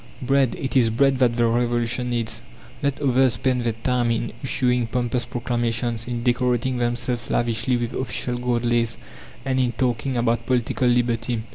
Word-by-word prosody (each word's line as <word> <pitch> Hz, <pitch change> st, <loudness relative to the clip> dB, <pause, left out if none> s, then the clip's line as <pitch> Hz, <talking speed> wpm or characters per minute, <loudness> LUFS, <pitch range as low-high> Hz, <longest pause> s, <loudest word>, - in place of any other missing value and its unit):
"Bread, 135 Hz, -1 st, +2 dB
it 135 Hz, -, -4 dB
is 120 Hz, -4 st, +5 dB
bread 135 Hz, +3 st, +2 dB
that 120 Hz, -3 st, +3 dB
the 120 Hz, -, +3 dB
Revolution 120 Hz, +1 st, +1 dB
needs!" 115 Hz, -2 st, -1 dB, 0.4 s
Let 140 Hz, -2 st, -1 dB
others 130 Hz, -3 st, +3 dB
spend 125 Hz, +2 st, 0 dB
their 115 Hz, -1 st, 0 dB
time 120 Hz, +1 st, 0 dB
in 115 Hz, 0 st, -1 dB
issuing 125 Hz, -2 st, +1 dB
pompous 120 Hz, 0 st, -1 dB
proclamations, 120 Hz, -1 st, -2 dB
in 120 Hz, -1 st, -3 dB
decorating 125 Hz, 0 st, +1 dB
themselves 120 Hz, 0 st, -2 dB
lavishly 120 Hz, +2 st, +1 dB
with 120 Hz, 0 st, -3 dB
official 125 Hz, -1 st, -2 dB
gold 120 Hz, -1 st, 0 dB
lace, 120 Hz, -1 st, +1 dB, 0.5 s
and 130 Hz, -1 st, 0 dB
in 125 Hz, -2 st, +1 dB
talking 125 Hz, +1 st, -1 dB
about 115 Hz, 0 st, 0 dB
political 125 Hz, 0 st, +1 dB
liberty!... 120 Hz, -1 st, +1 dB
120 Hz, 160 wpm, -23 LUFS, 115-125 Hz, 0.5 s, is